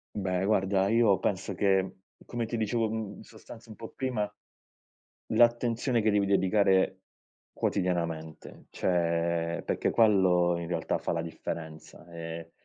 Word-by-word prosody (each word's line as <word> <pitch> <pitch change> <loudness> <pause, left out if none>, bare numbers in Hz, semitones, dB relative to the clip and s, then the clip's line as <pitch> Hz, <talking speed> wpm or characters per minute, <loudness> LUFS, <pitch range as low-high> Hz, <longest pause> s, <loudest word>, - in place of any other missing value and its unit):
Beh, 95 -2 -1
guarda, 95 -1 +2
io 110 -3 +4
penso 100 0 -2
che, 95 -1 +2 0.4
come 120 -1 -3
ti 115 +1 -3
dicevo, 110 +1 0
mhmm, 110 -2 -4
in - - -12
sostanza 115 0 -14
un 110 - -11
po' 115 - -9
prima, 120 -6 -2 1.0
l'attenzione 120 +1 +2
che 110 0 +2
devi 100 -1 +2
dedicare 95 0 +2 0.5
quotidianamente, 85 -4 -3
cioè 85 -1 0
perché - - 0
quello, 95 -6 +4
in 85 - -5
realtà, 85 -2 -1
fa - - -3
la 85 - -1
differenza 80 -1 -7
e 85 0 -7
95 Hz, 135 wpm, -29 LUFS, 85-110 Hz, 1.0 s, io